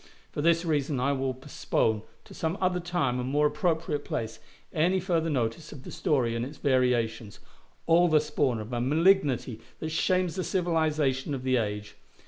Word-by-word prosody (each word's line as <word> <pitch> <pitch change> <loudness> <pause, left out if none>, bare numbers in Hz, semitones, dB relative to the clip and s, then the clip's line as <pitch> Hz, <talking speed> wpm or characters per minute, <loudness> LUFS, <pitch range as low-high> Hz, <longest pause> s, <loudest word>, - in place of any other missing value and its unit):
For - - -3
this 165 +2 +3
reason 145 -4 0
I 135 +3 +1
will 135 -1 -1
postpone, 115 -5 -1 0.2
to - - -13
some 165 +3 -2
other 180 -1 +1
time 175 -8 -1
and 125 +1 -3
more 145 +2 +2
appropriate 150 0 0
place, 110 0 -4 0.3
any 175 +4 +2
further 170 -3 0
notice 130 +2 -2
of 140 -4 -10
the - - -9
story 120 -6 0
and 115 - -1
its 140 +4 -7
variations, 120 -6 0 0.5
all 170 +2 +5
the 155 -2 +5
spawn 145 -5 0
of 110 +3 -7
a 120 - -1
malignity 145 - +2 0.2
that 160 - -4
shames 180 +2 +1
the 185 - -1
civilization 155 -7 0
of 130 - -6
the 130 -1 +2
age. 105 -2 -3
145 Hz, 175 wpm, -28 LUFS, 125-165 Hz, 0.5 s, all